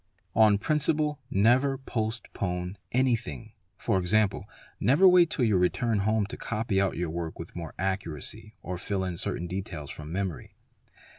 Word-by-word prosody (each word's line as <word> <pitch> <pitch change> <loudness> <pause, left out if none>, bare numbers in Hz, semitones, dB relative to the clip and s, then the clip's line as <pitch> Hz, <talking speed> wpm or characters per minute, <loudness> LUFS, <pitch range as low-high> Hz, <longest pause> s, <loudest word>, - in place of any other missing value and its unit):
On 110 -2 +6
principle, 150 +3 0
never 125 +7 +3
postpone 100 -7 -3
anything, 120 -3 0 0.4
e.g., 95 +3 +3 0.5
never 150 +10 +5
wait 180 -2 +6
till 130 - +1
your 105 -5 +3
return 110 +5 +1
home 110 +1 +2
to - - -7
copy 110 -3 -1
out 95 -2 0
your 85 -2 -2
work 85 -1 -4
with 85 - -9
more 85 -2 -6
accuracy 95 +3 -4
or 90 -1 -4
fill 95 0 -2
in 90 -2 -3
cata 90 -1 -3
details 85 -5 -5
from 75 +1 -8
memory. 95 -3 -4
100 Hz, 145 wpm, -28 LUFS, 90-120 Hz, 0.5 s, On